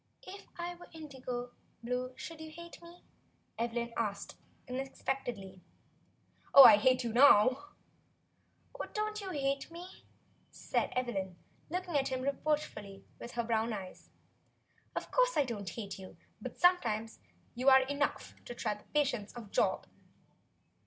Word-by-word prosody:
"If 395 +2 -10
I 350 0 -4
were 350 0 -14
indigo 255 -6 -6 0.3
blue 250 +1 -2
should 320 -1 -8
you 315 - -7
hate 340 +2 -11
me?" 340 +1 -14 0.6
Eve 235 0 -1
lyn 235 0 -3
asked, 205 -3 -3 0.3
unexpectedly. 250 -7 -4 0.9
"I 245 -7 +12
hate 255 +3 +3
you 230 -2 -3
now." 255 +1 +6 1.1
"Oh, - - -5
you - - -8
don't 425 0 -1
hate 280 -8 -2
me," 350 +2 -11 0.4
said - - -2
Evelyn, 195 -8 -2 0.3
looking 360 0 -3
at 270 - +1
him 260 -1 -2
reproachfully 275 -8 -2
with 240 - -8
her 235 - -1
brown 225 0 0
eyes. 190 -3 -8 0.9
"Of - - -4
course - - +3
I 290 - +4
don't 205 -6 -5
hate 200 -1 -6
you. 185 - -11 0.2
But - - -6
you - - -28
are - - -24 0.2
some - - -16
times 225 -1 -3 0.7
enough 285 +1 -2
to 240 - -7
try 225 - -1
the 210 - -14
patience 245 -8 0
of 230 -4 -10
Job." - - +1
255 Hz, 145 wpm, -33 LUFS, 225-305 Hz, 1.1 s, I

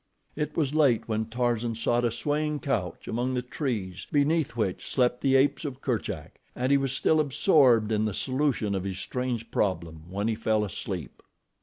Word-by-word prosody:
It 150 0 -3
was 150 -3 +1
late 140 -7 +3
when 110 -1 -1
Tarzan 120 0 -1
sought 120 +2 +1
a - - +3
swaying 150 +4 -1
couch 95 - -2
among 125 +3 -1
the 125 - -1
trees 105 - -4
beneath 150 -1 +2
which 105 -6 -1
slept 125 -1 +1
the 135 -1 +3
apes 140 +3 +3
of 135 -4 -5
Kerchak, 125 -6 -3 0.2
and 130 +2 0
he 140 - +6
was 135 -1 -1
still 155 +3 +2
absorbed 135 - +4
in 110 0 +2
the 105 - -1
solution 130 -6 0
of 95 -2 -1
his 95 -1 -4
strange 120 +3 -3
problem 85 -4 -2
when 100 +3 -2
he 115 - +1
fell 110 -1 +1
asleep. 90 -5 -6
120 Hz, 180 wpm, -27 LUFS, 105-140 Hz, 0.2 s, he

